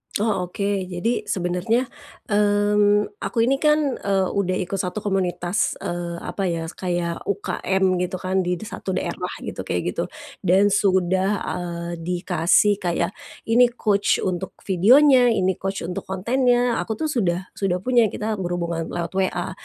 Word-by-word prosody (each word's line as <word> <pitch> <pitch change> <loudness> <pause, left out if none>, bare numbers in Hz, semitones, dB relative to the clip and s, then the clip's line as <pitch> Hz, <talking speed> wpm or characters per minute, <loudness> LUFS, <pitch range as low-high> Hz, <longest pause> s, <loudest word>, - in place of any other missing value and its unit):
Oh 205 -4 0
oke, 190 +3 -5 0.2
jadi 210 +5 -2
sebenernya, 190 +8 0 0.4
mmm, 205 0 +2
aku 195 +4 -5
ini 270 +3 +2
kan, 300 -3 +2
eee 195 -2 +1
udah 185 -2 0
ikut 195 +1 -4
satu 185 +3 -3
komunitas, 190 -1 0
eee 175 0 -3
apa 195 -2 -2
ya, 165 -1 -3
kayak 175 -2 -3
UKM 190 -1 0
gitu 180 +1 -2
kan 185 +1 -1
di 180 -1 0
di 175 - -9
satu 190 -3 -5
daerah - - -3 0.2
gitu, - - -6
kayak - - -1
gitu. - - -2 0.4
Dan 195 +2 +3
sudah, 190 -1 +2
ah, 170 -1 -4
dikasih 180 +3 +2
kayak, 175 0 -1 0.3
ini 240 +2 +5
coach 205 -4 +1
untuk 185 0 -3
videonya, 245 - +5
ini 190 0 +2
coach 195 -1 -3
untuk 180 +1 -5
kontennya, 245 +5 +1
aku 220 - -3
tuh 315 -1 -2
sudah 185 - -1
sudah 185 -2 -2
punya, 240 -2 +4
kita 215 0 -3
berhubungan 170 -2 -2
lewat 170 -1 -4
WA. 185 -1 -1
190 Hz, 150 wpm, -23 LUFS, 180-210 Hz, 0.4 s, ini